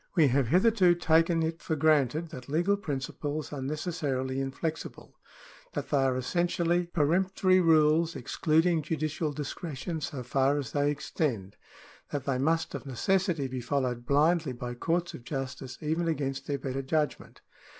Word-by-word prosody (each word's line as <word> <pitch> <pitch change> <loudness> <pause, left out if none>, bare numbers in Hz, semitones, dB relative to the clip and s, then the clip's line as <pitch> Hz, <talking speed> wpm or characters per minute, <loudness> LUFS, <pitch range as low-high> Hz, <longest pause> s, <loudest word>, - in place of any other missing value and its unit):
We 155 -6 +5
have 130 0 +2
hitherto 185 - +4
taken 165 0 +3
it 165 +1 -3
for 160 - -1
granted 155 +1 +2
that 130 -4 -9
legal 175 +7 +2
principles 150 -2 -4
are 140 - -4
necessarily 135 -3 -2
inflexible 155 +4 -5 0.3
— - - -22
that - - -4
they 145 - +3
are 135 -1 +2
essentially 175 +4 0
peremp 175 +3 +1
tory 185 -2 +4
rules 160 0 +4
excluding 165 +1 +1
judicial 155 0 -2
discretion 150 +2 -5
so 135 -3 -4
far 135 +3 +2
as 140 -5 -4
they 145 0 +1
extend 135 -9 -2 0.3
— - - -24
that 145 -2 -2
they 130 -2 0
must 160 +4 +1
of - - -6
necessity 170 - 0
be 130 -1 -5
followed 125 -1 -2
blindly 155 0 +3
by 120 0 -5
courts 170 +7 -1
of 120 - -9
justice 135 -1 -5
even 160 +2 -1
against 135 -4 -2
their 145 - -1
better 135 0 -3
judgment. 150 +2 -2
150 Hz, 160 wpm, -29 LUFS, 135-165 Hz, 0.3 s, We